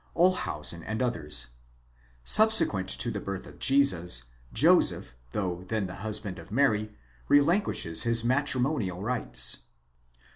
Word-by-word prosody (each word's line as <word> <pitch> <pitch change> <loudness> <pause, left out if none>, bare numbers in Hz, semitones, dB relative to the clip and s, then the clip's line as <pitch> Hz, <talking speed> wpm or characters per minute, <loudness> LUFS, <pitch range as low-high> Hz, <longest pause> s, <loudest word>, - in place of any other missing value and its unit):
Olshausen 85 - 0
and 110 0 -5
others: 75 - -2 0.7
subsequent 215 - +5
to 60 0 +2
the - - -4
birth 95 -1 -6
of - - -15
Jesus, 90 - +2 0.3
Joseph, - - +3 0.2
though 90 +4 -3
then 100 +2 -3
the 90 - -7
husband 105 -2 -4
of 80 +2 -14
Mary, 110 -4 0 0.3
relinquishes 145 - +1
his 115 -1 +2
matrimonial 125 - -1
rights. 125 +2 0
110 Hz, 115 wpm, -27 LUFS, 90-135 Hz, 0.7 s, subsequent